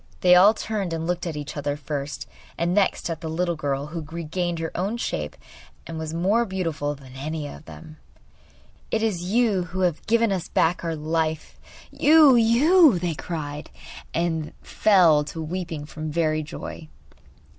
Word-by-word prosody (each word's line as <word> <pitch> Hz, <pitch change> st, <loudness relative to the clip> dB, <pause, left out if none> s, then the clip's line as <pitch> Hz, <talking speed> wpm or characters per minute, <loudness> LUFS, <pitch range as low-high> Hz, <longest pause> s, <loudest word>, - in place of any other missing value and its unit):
They 180 Hz, -1 st, +6 dB
all 195 Hz, +5 st, +7 dB
turned 205 Hz, -7 st, -3 dB
and 165 Hz, 0 st, -3 dB
looked 175 Hz, +1 st, -2 dB
at 160 Hz, -3 st, -4 dB
each 145 Hz, -1 st, -6 dB
other 145 Hz, 0 st, -2 dB
first, 145 Hz, -1 st, -5 dB, 0.3 s
and 170 Hz, +1 st, 0 dB
next 200 Hz, 0 st, +1 dB
at 160 Hz, -1 st, -5 dB
the 160 Hz, -, -4 dB
little 170 Hz, +2 st, -1 dB
fish 145 Hz, -1 st, -3 dB
who 170 Hz, -, -4 dB
had 155 Hz, -1 st, -10 dB
regained 170 Hz, +1 st, -3 dB
her 165 Hz, 0 st, -3 dB
own 200 Hz, +6 st, -1 dB
shape -, -, -3 dB, 0.5 s
and 165 Hz, -1 st, -6 dB
was 160 Hz, -1 st, -4 dB
more 190 Hz, +8 st, +2 dB
beautiful 165 Hz, -8 st, -3 dB
than 135 Hz, -2 st, -14 dB
any 150 Hz, +3 st, -4 dB
of 150 Hz, -, -11 dB
them. 155 Hz, -1 st, -12 dB, 0.9 s
'It 220 Hz, -, 0 dB
is 205 Hz, -6 st, 0 dB
you 215 Hz, -6 st, +2 dB
who 185 Hz, +1 st, -5 dB
have 175 Hz, -4 st, 0 dB
given 230 Hz, -1 st, +3 dB
us 185 Hz, -3 st, -2 dB
back 170 Hz, +2 st, +1 dB
our 165 Hz, -1 st, -2 dB
life; 155 Hz, 0 st, -2 dB, 0.3 s
you, 300 Hz, -3 st, +6 dB
you!' 255 Hz, -, +5 dB
they 175 Hz, -1 st, -2 dB
cried; 150 Hz, -2 st, -6 dB, 0.4 s
and 160 Hz, -2 st, -2 dB
fell 175 Hz, -8 st, +4 dB
to 150 Hz, +2 st, -7 dB
weeping 160 Hz, -2 st, -4 dB
from 155 Hz, +1 st, -6 dB
very 155 Hz, -1 st, +1 dB
joy. 155 Hz, +1 st, -8 dB
165 Hz, 170 wpm, -24 LUFS, 155-190 Hz, 0.9 s, all